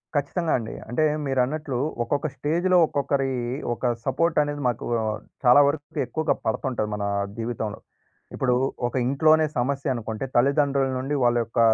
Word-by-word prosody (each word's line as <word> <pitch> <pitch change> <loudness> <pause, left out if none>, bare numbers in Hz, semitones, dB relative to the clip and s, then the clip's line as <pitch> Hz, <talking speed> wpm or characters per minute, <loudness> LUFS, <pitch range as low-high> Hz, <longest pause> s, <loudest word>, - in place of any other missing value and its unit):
ఖచ్చితంగా 160 +3 0
అండి. 115 -1 -6 0.2
అంటే 140 +6 +1 0.2
మీరన్నట్లు 135 +1 -1 0.3
ఒక్కొక్క 145 +5 -1
స్టేజ్‌లో, 175 +5 +1
ఒక్కొక్కరి 140 -1 0 0.4
ఒక 120 +1 0
సపోర్ట్ 170 -1 +1
అనేది 145 0 -4
మాకు 120 -2 -2 0.6
చాలా 125 +3 +7
వరకు 145 0 -3
ఎక్కువగా 160 -1 0
పడుతుంటది 110 -1 -1
మన 100 - -4 0.3
జీవితంలో. 115 -2 -4 0.6
ఇప్పుడు 125 -2 +1 0.3
ఒక 120 - -7
ఇంట్లోనే 155 +3 +4
సమస్య 135 +1 0
అనుకుంటే, 115 +2 -4
తల్లిదండ్రుల 140 +1 +3
నుండి 140 +3 -2
వాళ్ళ 120 0 +3
యొక్క 115 +1 -3
135 Hz, 135 wpm, -24 LUFS, 120-145 Hz, 0.6 s, చాలా